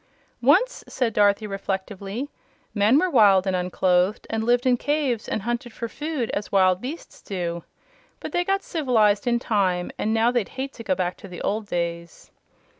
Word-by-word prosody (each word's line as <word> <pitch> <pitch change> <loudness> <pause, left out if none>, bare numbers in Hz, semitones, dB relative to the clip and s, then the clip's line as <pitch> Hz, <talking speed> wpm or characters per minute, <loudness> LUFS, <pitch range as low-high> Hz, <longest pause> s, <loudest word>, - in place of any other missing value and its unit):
"Once," 375 - +3
said 240 -4 -1
Dorothy, 205 +1 +3
reflectively, 195 +5 -4 0.4
"men 215 +5 +4
were 370 - +3
wild 205 - +5
and 190 -1 0
unclothed 180 +2 +1
and 220 0 -1
lived 245 +2 +2
in 255 -1 +4
caves 275 -4 -1
and 205 - -2
hunted 240 +1 -3
for 230 - -4
food 295 -2 -3
as 205 - -4
wild 185 -1 +3
beasts 290 +7 -8
do. 170 -3 -4 0.6
But - - -6
they 350 - +1
got 390 +2 0
civ'lized, 225 - +2
in 240 -1 +3
time, 190 -6 0
and 215 - 0
now 225 +2 +3
they'd 240 -5 -1
hate 270 +1 -3
to 230 - -9
go 190 -4 0
back 180 -1 -2
to - - -11
the 180 -2 -8
old 210 +1 -1
days." 170 -2 -4
215 Hz, 180 wpm, -24 LUFS, 190-250 Hz, 0.6 s, wild